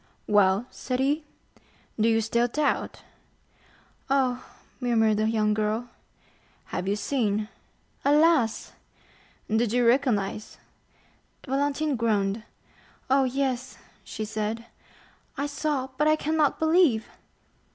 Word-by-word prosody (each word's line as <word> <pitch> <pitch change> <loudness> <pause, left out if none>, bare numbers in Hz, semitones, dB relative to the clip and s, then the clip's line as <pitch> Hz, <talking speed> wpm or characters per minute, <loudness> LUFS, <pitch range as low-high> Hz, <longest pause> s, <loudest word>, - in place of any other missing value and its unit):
"Well," 205 +1 +3
said 255 -1 -4
he, 290 +3 +1 0.7
"do 220 +2 +4
you 225 0 +3
still 235 +2 +1
doubt?" 295 +4 -1 1.1
"Oh," 260 -2 +1 0.4
murmured 225 -4 +2
the 215 +1 +1
young 215 -1 +1
girl. 215 +3 -1 0.8
"Have 180 - -2
you 200 - +1
seen?" 215 -3 -1 0.5
"Alas!" 295 -5 +3 0.7
"Did 220 0 +1
you 245 0 +2
recognize?" 230 -5 +1 0.9
Valentine 285 +2 0
groaned. 210 -2 0 0.7
"Oh, 270 0 +4
yes;" 260 -1 -2 0.3
she 215 - -5
said, 220 +1 -3 0.7
"I 280 - -1
saw, 285 -2 -2
but 300 - +3
I 310 - +5
cannot 310 -1 +1
believe!" 320 -8 +3
245 Hz, 105 wpm, -26 LUFS, 215-280 Hz, 1.1 s, I